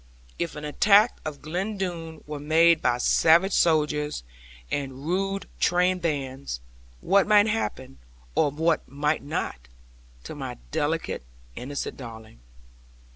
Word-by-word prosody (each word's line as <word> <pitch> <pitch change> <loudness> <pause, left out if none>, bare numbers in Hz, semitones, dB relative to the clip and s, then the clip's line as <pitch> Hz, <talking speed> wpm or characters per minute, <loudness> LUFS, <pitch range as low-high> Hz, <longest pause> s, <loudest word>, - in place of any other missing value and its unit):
If 170 -2 -2
an 150 0 -6
attack 205 +9 +4
of 150 -2 -6
Glen 185 +7 -3
Doone 165 -4 -5
were 150 -1 -6
made 160 +2 +4
by 120 - +2
savage 170 +9 +4
soldiers 150 - +1 0.5
and 135 0 -4
rude 195 +3 -1
train 180 +1 +2
bands, 140 - -3 0.4
what 200 0 +3
might 210 -1 +6
happen, 130 - -3 0.3
or 145 - +3
what 160 +3 0
might 150 +3 0
not, - - -4 0.6
to - - -7
my - - -6
delicate, - - -1 0.3
innocent 140 +3 -5
darling? 110 - -10
155 Hz, 125 wpm, -26 LUFS, 140-180 Hz, 0.6 s, might